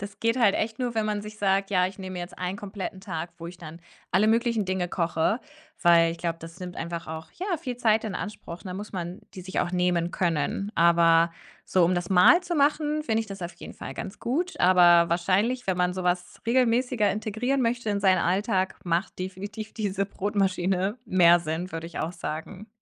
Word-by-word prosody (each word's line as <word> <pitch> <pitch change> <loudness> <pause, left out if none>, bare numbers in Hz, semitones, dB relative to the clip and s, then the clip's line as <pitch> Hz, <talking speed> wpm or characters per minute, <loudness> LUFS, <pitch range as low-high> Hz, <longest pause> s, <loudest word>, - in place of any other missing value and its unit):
Das 200 0 -8
geht 230 +2 +1
halt 220 -5 +4
echt 220 0 -2
nur, 245 -2 -2
wenn 220 -1 0
man 210 -1 -1
sich 210 0 -9
sagt: 195 0 +1
„Ja, 180 -1 +3
ich 190 - -10
nehme 190 -1 -7
mir 180 - -5
jetzt 175 +2 -8
einen 185 +2 -3
kompletten 195 -2 -6
Tag, 170 -4 -5
wo 170 - -6
ich 180 +1 -10
dann 165 0 -10 0.3
alle 200 +4 +4
möglichen 230 -1 +2
Dinge 185 -1 -1
koche." 170 +6 0 0.4
Weil 170 -1 +5
ich 170 - -7
glaube, 165 -1 -2
das 165 +3 -11
nimmt 180 -1 -7
einfach 170 0 -5
auch, 160 0 -6
ja, 365 -1 -2
viel 255 -6 -5
Zeit 220 -2 +2
in 215 -4 -4
Anspruch, 205 -5 -6
ne, - - -18
dann 180 - -5
muss 210 +1 -7
man 180 0 -5 0.2
die 185 - -7
sich 185 +1 -3
auch 175 - -1
nehmen 180 -1 +1
können. 175 +3 -1
Aber 170 0 +5 0.3
so, 185 - +3
um 180 - +2
das 175 -1 -2
mal 195 - +6
zu 350 -1 -3
machen, 300 +1 +1
finde 225 -6 +1
ich 220 - -8
das 195 -2 -8
auf 170 0 -5
jeden 170 - -10
Fall - - -8
ganz 195 +2 -7
gut, 340 +10 -2
aber 175 -2 +6
wahrscheinlich, 195 +9 +1
wenn 185 -1 +1
man 180 0 +1
so 185 0 -4
was 180 0 -2
regelmäßiger 245 -2 +2
integrieren 225 +6 -1
möchte 235 -1 0
in 200 - 0
seinen 190 -2 +4
Alltag, 190 +1 0
macht 175 +2 -1
definitiv 200 +3 -6
diese 200 -2 -1
Brotmaschine 195 0 0
mehr 175 -2 +5
Sinn, 170 +2 -4
würde 165 0 -5
ich 170 - -7
auch 165 - -2
sagen. 170 +5 -6
190 Hz, 215 wpm, -26 LUFS, 175-215 Hz, 0.4 s, mal